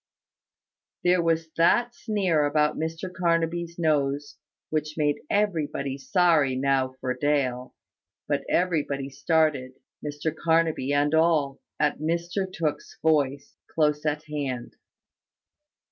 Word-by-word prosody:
There 180 Hz, 0 st, +4 dB
was 165 Hz, -1 st, 0 dB
that 240 Hz, +9 st, +3 dB
sneer 190 Hz, -11 st, 0 dB
about 150 Hz, +1 st, +2 dB
Mr 165 Hz, +3 st, -4 dB
Carnaby's 170 Hz, -1 st, 0 dB
nose 145 Hz, -3 st, 0 dB, 0.3 s
which 155 Hz, 0 st, -2 dB
made 145 Hz, -2 st, +1 dB
everybody 150 Hz, -9 st, -1 dB
sorry 155 Hz, -3 st, +3 dB
now 130 Hz, -1 st, +1 dB
for 130 Hz, -1 st, -1 dB
Dale: 130 Hz, -2 st, -1 dB, 0.5 s
but -, -, 0 dB
everybody 145 Hz, -6 st, 0 dB
started, 145 Hz, -2 st, +1 dB, 0.3 s
Mr 150 Hz, +2 st, -3 dB
Carnaby 160 Hz, -4 st, +1 dB
and 145 Hz, +1 st, +2 dB
all, 160 Hz, -4 st, +2 dB, 0.2 s
at 150 Hz, -1 st, +1 dB
Mr 170 Hz, +4 st, -2 dB
Tooke's 155 Hz, -4 st, -3 dB
voice, 140 Hz, -3 st, +1 dB, 0.2 s
close 150 Hz, -2 st, +2 dB
at 150 Hz, 0 st, -1 dB
hand. 140 Hz, -5 st, -4 dB
150 Hz, 110 wpm, -26 LUFS, 140-165 Hz, 0.5 s, There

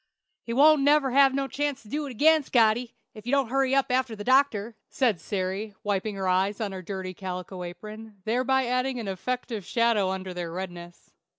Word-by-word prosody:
"He 230 Hz, -, -7 dB
won't 295 Hz, +4 st, +5 dB
never 285 Hz, -1 st, +3 dB
have 270 Hz, 0 st, +5 dB
no 275 Hz, 0 st, -1 dB
chance 285 Hz, -1 st, -3 dB
to -, -, -17 dB
do 295 Hz, +6 st, -3 dB
it -, -, -6 dB
again, 310 Hz, +6 st, +4 dB
Scotty, 235 Hz, -2 st, +2 dB, 0.2 s
if 215 Hz, +1 st, -12 dB
you -, -, -1 dB
don't 275 Hz, -4 st, +2 dB
hurry 270 Hz, 0 st, +2 dB
up 275 Hz, -2 st, +1 dB
after 250 Hz, -2 st, 0 dB
the 205 Hz, -, -7 dB
doctor," 240 Hz, -4 st, +2 dB
said 230 Hz, -10 st, +1 dB
Sary, 195 Hz, +1 st, -3 dB
wiping 205 Hz, 0 st, -1 dB
her 190 Hz, -1 st, -3 dB
eyes 190 Hz, +3 st, +1 dB
on 210 Hz, -3 st, -2 dB
her 190 Hz, -1 st, -6 dB
dirty 185 Hz, 0 st, -5 dB
calico 185 Hz, 0 st, -6 dB
apron, 215 Hz, +4 st, -9 dB
thereby 255 Hz, +3 st, +1 dB
adding 255 Hz, +1 st, -1 dB
an 225 Hz, -, -5 dB
effective 225 Hz, +3 st, -4 dB
shadow 230 Hz, -3 st, +1 dB
under 190 Hz, -1 st, -4 dB
their 175 Hz, -2 st, -5 dB
redness. 175 Hz, -1 st, -8 dB
225 Hz, 195 wpm, -26 LUFS, 190-265 Hz, 0.2 s, won't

